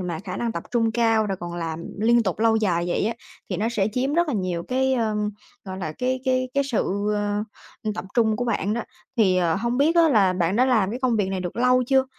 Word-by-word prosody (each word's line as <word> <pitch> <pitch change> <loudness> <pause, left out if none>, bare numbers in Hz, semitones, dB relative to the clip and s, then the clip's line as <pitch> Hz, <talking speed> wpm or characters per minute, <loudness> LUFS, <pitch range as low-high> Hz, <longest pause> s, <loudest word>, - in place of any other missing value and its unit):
mà 175 -3 -3
khả 185 -2 -5
năng 235 +1 -2
tập - - -4
trung 225 -2 +1
cao 225 -2 +2
rồi 195 -2 -2
còn 175 0 -5
làm 165 -1 -4 0.2
liên 235 +2 +4
tục 190 -4 -2
lâu 225 0 +3
dài 175 -6 +1
vậy 175 - 0
á, 230 - -1 0.4
thì 185 - -1
nó 220 +3 0
sẽ 210 -4 0
chiếm 265 +4 0
rất 345 -1 +2
là 250 - -1
nhiều 180 -3 -2
cái, 265 +1 +1
ờm, 215 -3 0 0.3
gọi 190 -1 -6
là, 155 -4 -4
cái 255 0 -1
cái 255 -1 +1
cái 280 0 +2
sự, 240 -7 -1 0.9
ờ, 215 - 0
tập 215 - -5
trung 220 -3 +3
của 245 - -2
bạn 210 -3 0
đó. 235 - -2 0.3
Thì, 195 -5 +4
ờ, 170 -3 +2
hông 235 +4 -1
biết 320 +4 +3
á 335 -1 +6
là 205 -9 +4
bạn 180 +2 0
đã 250 - +4
làm 220 -7 +2
cái 240 - -4
công 245 -3 +2
việc 200 -3 0
này 190 -1 -2
được 180 +2 -5
lâu 250 +1 +3
chưa? 265 0 +3
220 Hz, 255 wpm, -24 LUFS, 190-250 Hz, 0.9 s, á